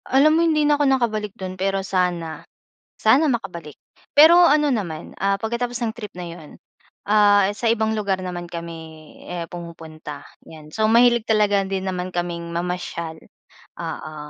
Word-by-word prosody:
Alam 280 +4 +5
mo 325 - +3
hindi 310 -3 +2
na 295 0 +2
ako - - +4
nakabalik 215 -6 0
dun 185 -1 -5
pero 195 +1 -2
sana 180 -4 -1 0.5
sana 265 +9 +4
makabalik. 180 - -4 0.4
Pero 320 +4 +8
ano 295 -1 +3
naman, 170 -9 -4
ah, 195 0 +2
pagkatapos 235 +3 -3
ng 225 - -1
trip 220 -4 -10
na 180 - -6
yun 170 -3 -9 0.5
ah, 205 -1 +4
sa 220 +3 -3
ibang 220 -1 +1
lugar 200 -4 -1
naman 175 -1 -5
kami 165 -2 -9
eh, 175 -1 -4
pumupunta, 160 -4 -9 0.2
yan. 155 -1 -13
So 215 +5 +1
mahilig 235 0 +4
talaga 210 -2 +3
din 190 -1 -3
naman 185 -1 -3
kaming 175 -1 -3
mamasyal, 170 -2 -4 0.6
oo, 155 - -6
195 Hz, 155 wpm, -22 LUFS, 170-230 Hz, 0.6 s, Pero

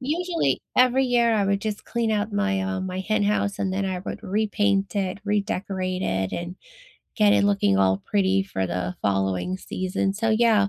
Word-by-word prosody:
usually, 335 +6 0 0.2
every 255 +1 +4
year, 240 -2 +3
I 205 -2 +2
would 200 0 +1
just 215 0 -4
clean 235 -2 -1
out 210 0 -1
my, 205 -1 0
um, 190 0 -2
my 185 0 -4
hen 215 +2 0
house, 205 -1 0
and 190 -1 -1
then 195 +1 -1
I 185 -1 -2
would 195 +2 -7
repaint 205 -2 0
it, 190 -1 -1
redecorate 195 -3 -2
it, 95 - -1
and 175 +1 -5 0.6
get 210 -2 +4
it - - +4
looking 200 - +2
all 95 0 +3
pretty 195 -1 +2
for 95 - -3
the 90 0 -3
following 95 - 0
season. 185 +1 -2
So, 225 +2 0
yeah, 220 -2 +4
200 Hz, 185 wpm, -24 LUFS, 185-215 Hz, 0.6 s, every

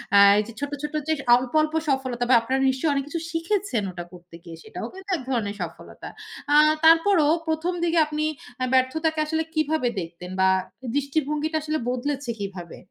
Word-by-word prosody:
আ - - +8 0.2
এইযে 220 +2 -3
ছোট্ট, 285 0 -4
ছোট্ট 295 +1 -4
যে - - +4 0.2
অল্প, 250 0 -2
অল্প 310 0 -1 0.2
সফলতা 260 -3 -1
বা - - +6
আপনারা 260 +3 -1
নিশ্চয়ই 265 +4 0
অনেক 275 -1 0
কিছু 335 +3 -4
শিখেছেন 330 - -1
ওটা 175 -1 -7
করতে 175 -1 -14
গিয়ে 165 -1 -10
সেটাও - - -7
কিন্তু 380 +1 -12
এক - - -8
ধরনের 210 -5 -1
সফলতা। 165 -2 -8 0.5
আ - - +6 0.3
তারপরও 330 -1 +5 0.2
১ম 320 +3 -1
দিকে 335 0 +1
আপনি 305 0 -2 0.4
আ - - +2
ব্যর্থতাকে 310 +5 +1
আসলে 320 +1 -1
কীভাবে 310 -4 +1
দেখতেন? 170 +2 -9
বা 190 - +5 0.5
দৃষ্টিভঙ্গিটা 300 +2 -1
আসলে 310 0 -1
বদলেছে 260 +1 -3
কীভাবে? 190 -4 -7
285 Hz, 170 wpm, -24 LUFS, 235-315 Hz, 0.5 s, আ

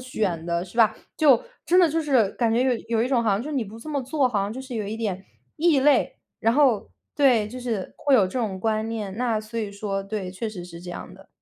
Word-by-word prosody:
选 205 -10 -2
的。” 170 0 -1
是 185 - -14
吧？ 220 -2 +5 0.2
就 275 -7 +5 0.2
真 360 +2 +5
的 350 - +5
就 325 +2 0
是， 260 -9 +3
感 230 -2 +1
觉 240 +2 +3
有 260 -1 +2 0.2
有 - - +3
一 245 - 0
种 245 -3 +2
好 220 - +3
像 200 +2 +1
就 285 - -6
是 300 - -3
你 245 - 0
不 215 +2 -11
这 230 - -10
么 285 -3 -1
做， 265 +1 +1
好 215 -5 0
像 200 +2 -2
就 255 - -6
是 260 -1 -8
有 215 -2 -2
一 210 - -4
点 200 -4 -3 0.3
异 315 -3 +3
类。 280 -1 +3 0.2
然 225 - +2
后， 255 -6 +3 0.3
对， 245 -7 +4
就 250 +4 -8
是 230 -6 -4
会 285 - +2
有 210 -7 +5
这 190 +8 -4
种 200 -6 -2
观 220 +1 0
念。 210 -4 -4
那 230 -2 0
所 215 +2 -6
以 210 -3 -3
说， 200 -1 -3
对， 195 -2 -4
确 190 +5 -5
实 190 -5 -7
是 170 -1 -10
这 180 - -7
样 175 - -8
的。 195 +1 -17
225 Hz, 290 characters per minute, -24 LUFS, 200-260 Hz, 0.3 s, 吧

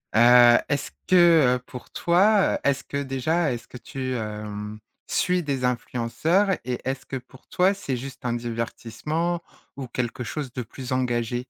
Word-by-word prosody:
Heu, 120 +1 +8
est-ce 140 -1 -1 0.2
que, 165 -8 +6
heu, - - -10
pour 125 - -10
toi, 195 +4 +3
heu, - - 0
est-ce 140 -1 +1
que 140 - -5
déjà, 140 +3 0
est-ce 115 -2 -7
que 125 - -10
tu, 130 +2 -5
hem, 105 -1 -5 0.3
suis 180 -1 +1
des 135 -3 -1
influenceurs 125 - 0
et 125 -1 -2
est-ce 135 0 -3
que 135 - -5
pour 130 0 -11
toi 185 +2 +3
c'est 140 -10 -4
juste 130 0 -9
un 120 - 0
divertissement 120 +8 -3 0.3
ou 135 -2 -6
quelque 125 0 -3
chose 135 +1 -5
de 125 - -3
plus 125 +2 -8
engagé? 120 -2 0
130 Hz, 165 wpm, -25 LUFS, 120-155 Hz, 0.3 s, Heu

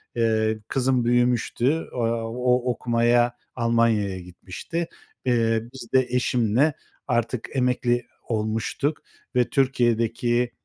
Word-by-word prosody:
eee, 110 -1 +1
kızım 130 -2 +1
büyümüştü, 120 +4 +1
aaa, 115 -1 -1
o 125 +1 +1
okumaya 120 0 +2 0.2
Almanya'ya 115 -5 +1
gitmişti. 90 - -6 0.4
Eee, 115 -2 +2
biz 125 -3 -9
de 130 -1 +4
eşimle 125 +3 +2 0.3
artık 120 0 -1
emekli 125 -1 +1 0.2
olmuştuk 110 +7 -1 0.3
ve 125 -1 +3
Türkiye'deki, 120 -2 +1
120 Hz, 95 wpm, -24 LUFS, 115-125 Hz, 0.4 s, de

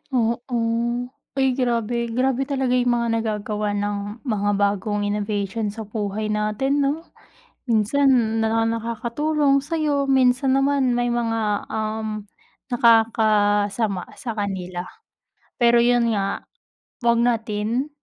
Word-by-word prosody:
Oo, 235 -1 +1 0.9
uy 270 -1 +2
grabe, 235 -1 0
grabe 255 +3 0
talaga 265 -3 -1
yung 245 -1 +2
mga 235 0 0
nagagawa 210 -1 -2
ng 205 0 -1 0.3
mga 210 -6 0
bagong 205 +1 0
innovation 205 +1 -2
sa 215 +2 -5
buhay 210 0 -3
natin, 215 +7 0
'no? 285 +3 0 0.6
Minsan 235 0 +2
na 225 +1 +1
nakakatulong 240 +6 0
sa'yo, 300 -3 0
minsan 260 0 +3
naman 270 -2 +2
may 245 0 0
mga, 225 -3 -1
um, 215 0 -3 0.5
nakakasama 215 -4 +2
sa 230 -3 -6
kanila. 185 -3 -3 0.7
Pero 235 -1 +5
yun 240 -1 +3
nga 195 0 -2 0.5
'wag 235 -1 +3
natin 230 +2 0
230 Hz, 110 wpm, -22 LUFS, 210-250 Hz, 0.9 s, Pero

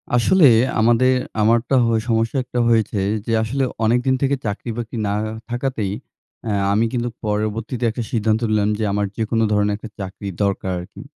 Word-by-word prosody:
আসলে 160 +8 +4 0.3
আমাদের 120 +3 +4 0.3
আমারটা 115 +4 +2
হয় 115 -1 +2
সমস্যা 115 +3 +1
একটা 125 0 -4
হয়েছে, 110 -2 +2 0.3
যে 115 - -3
আসলে 135 +5 -1 0.2
অনেক 120 +3 +3
দিন 130 0 +3
থেকে 140 0 +2
চাকরি 105 +3 -4
বাকরি 120 0 -5
না - - 0 0.4
থাকাতেই 120 -5 -2 0.5
অ্যা 110 - -2 0.2
আমি 110 +3 +2
কিন্তু 120 -1 -1 0.2
পরবর্তীতে 110 +4 -2
একটা 115 +2 -4
সিদ্ধান্ত 110 -2 +1
নিলাম 105 -1 +2
যে - - 0
আমার 105 0 0
যেকোনো 115 0 0
ধরনের 105 0 +2
একটা 110 +1 -9
চাকরি 95 +1 -6 0.2
দরকার 100 -1 -1
আর 90 - -7
কী। - - -10
115 Hz, 170 wpm, -20 LUFS, 105-120 Hz, 0.5 s, আসলে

